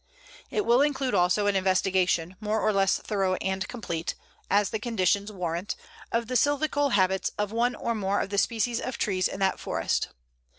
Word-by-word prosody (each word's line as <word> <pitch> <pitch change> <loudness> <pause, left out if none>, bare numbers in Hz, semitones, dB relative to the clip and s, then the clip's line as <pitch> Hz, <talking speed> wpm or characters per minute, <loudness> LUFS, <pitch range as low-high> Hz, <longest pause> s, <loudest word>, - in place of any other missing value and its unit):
It 420 - -1
will 240 +3 +5
include 275 -3 +1
also 180 +4 +3
an 205 -1 +2
investigation, 185 -2 +1
more 215 0 -1
or 215 - +2
less 195 -1 +3
thorough 195 -3 0
and 190 0 -2
complete, 170 -9 -4 0.3
as 205 0 +3
the 220 - -2
conditions 205 -2 0
warrant, 180 -1 -3 0.4
of 230 0 0
the 255 - -5
silvical 290 +1 +2
habits 190 -1 +2
of 210 0 -1
one 240 +2 +1
or 235 - -2
more 200 -2 0
of 195 - -3
the 200 - +2
species 230 +2 0
of 255 - -4
trees 185 -3 +1
in - - -7
that 190 -1 +1
forest. - - -1
205 Hz, 180 wpm, -27 LUFS, 190-235 Hz, 0.4 s, will